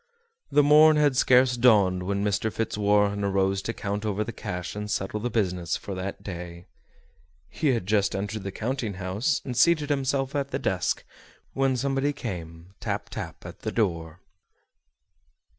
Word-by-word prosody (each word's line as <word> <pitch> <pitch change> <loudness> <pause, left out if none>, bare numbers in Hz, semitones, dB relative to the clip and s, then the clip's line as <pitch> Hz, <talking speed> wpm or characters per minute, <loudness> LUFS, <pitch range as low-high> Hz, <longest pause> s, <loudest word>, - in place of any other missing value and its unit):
The 145 - +5
morn 150 +2 +7
had 145 -3 +3
scarcely 125 -1 +4
dawned 100 -7 +5
when 100 +2 -1
Mr. 105 +2 0
Fitzwarren 105 -2 +1
arose 95 0 +1
to 115 - -3
count 100 -2 -4
over 105 -1 -1
the 115 - -5
cash 90 -3 -5
and 105 0 -5
settle 100 +1 -2
the 120 +3 -2
business 90 -7 -1
for 100 - -7
that 95 +1 -5
day. 85 -2 -7 0.8
He 110 - -2
had 120 -8 +1
just 100 0 +1
entered 100 +2 -3
the 100 0 -5
counting 115 -1 -3
house, 100 - -1
and 125 - -4
seated 150 +2 +3
himself 135 0 0
at 140 -1 -1
the - - -2
desk, - - -1 0.5
when 135 -1 +1
somebody 135 +2 0
came, 90 - -7
tap, - - -3
tap, - - -7
at - - -9
the - - -4
door. 85 -5 -2
105 Hz, 160 wpm, -26 LUFS, 95-130 Hz, 0.8 s, morn